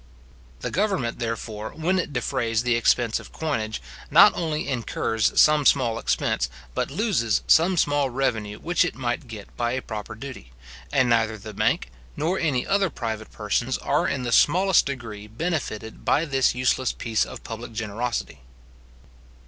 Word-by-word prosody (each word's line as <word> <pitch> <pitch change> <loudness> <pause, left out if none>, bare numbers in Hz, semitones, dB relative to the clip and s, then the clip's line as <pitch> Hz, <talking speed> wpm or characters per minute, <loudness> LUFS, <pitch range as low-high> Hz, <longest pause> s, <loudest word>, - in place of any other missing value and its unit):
The - - -3
government, 180 - 0
therefore, 110 -2 -4
when 180 +4 +1
it 165 - -2
defrays 120 -4 -1
the 120 -1 +2
expense 120 -1 +2
of - - -12
coinage, 115 -9 -2 0.3
not - - +8
only 155 -3 -2
incurs 115 -3 0
some 150 -1 +6
small 120 -5 +3
expense, - - 0 0.2
but - - -1
loses 145 - +1
some 175 +3 +4
small 145 -3 +2
revenue 110 -5 -1
which 175 +6 +1
it 180 - -2
might 120 0 -3
get 110 -3 -10
by 120 0 -1
a 130 - -2
proper 110 0 -6
duty; 110 - -9 0.4
and 130 -3 +3
neither 115 -2 +2
the 110 +1 -9
bank, 60 - 0 0.3
nor 170 +6 0
any 140 -7 0
other 195 -1 +2
private 110 -5 -5
persons, 115 +4 -1
are 145 - 0
in 130 - -2
the 120 - -2
smallest 185 +6 +4
degree 115 -6 -6
benefited 110 -4 -4
by 160 - +2
this 135 -5 +2
useless 130 0 +1
piece 115 -2 0
of - - -8
public 115 +1 -7
generosity. 110 +2 -3
120 Hz, 155 wpm, -24 LUFS, 110-150 Hz, 0.4 s, not